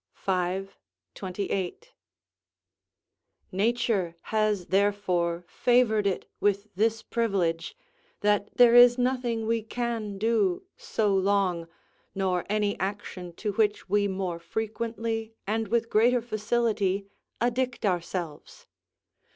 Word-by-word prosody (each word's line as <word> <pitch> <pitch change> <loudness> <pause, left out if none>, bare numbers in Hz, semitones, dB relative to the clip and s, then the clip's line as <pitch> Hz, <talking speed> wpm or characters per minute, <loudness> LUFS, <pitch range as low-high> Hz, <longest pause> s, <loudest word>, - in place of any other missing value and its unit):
v. 185 0 -1 0.5
28.] 190 - -4 1.6
nature 200 -3 0
has 215 -4 0
therefore 180 -3 +1
favoured 220 -2 +2
it 190 - -2
with 205 +1 0
this 225 +3 +1
privilege, 195 - -1 0.4
that 205 0 +2
there 245 -1 +7
is 245 0 +8
nothing 245 -3 0
we 230 0 +1
can 225 -2 -3
do 210 -4 +1
so 225 - 0
long, 190 -3 +1 0.5
nor 185 -2 0
any 210 -1 +1
action 190 -2 -4
to 210 +4 -3
which 210 0 0
we 205 +1 +3
more 185 -3 -3
frequently 225 +3 -3
and 220 +2 -1
with 230 +1 +1
greater 240 +3 +4
facility 215 -3 0 0.3
addict 245 0 0
ourselves. 175 - -3
210 Hz, 100 wpm, -27 LUFS, 190-230 Hz, 1.6 s, is